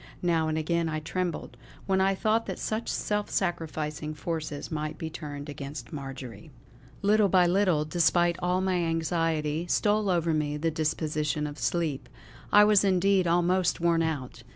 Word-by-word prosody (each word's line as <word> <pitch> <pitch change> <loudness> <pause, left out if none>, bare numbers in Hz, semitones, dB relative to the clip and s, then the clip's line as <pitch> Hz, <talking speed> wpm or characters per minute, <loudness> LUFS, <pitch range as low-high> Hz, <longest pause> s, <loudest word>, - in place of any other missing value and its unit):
Now 165 -2 +2
and 155 0 -1
again 165 +1 0
I 155 0 -2
trembled, 175 +2 -4 0.3
when 190 -1 +2
I 195 0 +3
thought 220 +3 +1
that - - -4
such 220 +2 -3
self 210 0 -1
sacrificing 155 -4 -2
forces 155 -1 -4
might 155 0 -3
be 160 -1 -5
turned 145 -2 -7
against 145 +2 -7
Marjory. 135 -4 -8 0.5
Little 205 0 +4
by 180 -1 +5
little, 175 -4 +2
despite 175 +1 +2
all 180 +1 +1
my 190 -1 +1
anxiety, 165 -1 0
stole 210 -1 +2
over 170 -2 +1
me 150 -1 -1
the 165 +2 0
disposition 150 -1 -1
of 145 -1 -6
sleep. 140 +3 -1 0.4
I 205 - +8
was 210 -1 +5
indeed 190 -1 +3
almost 175 +1 +2
worn 170 -1 +2
out. 140 -7 -3
165 Hz, 155 wpm, -28 LUFS, 150-185 Hz, 0.5 s, I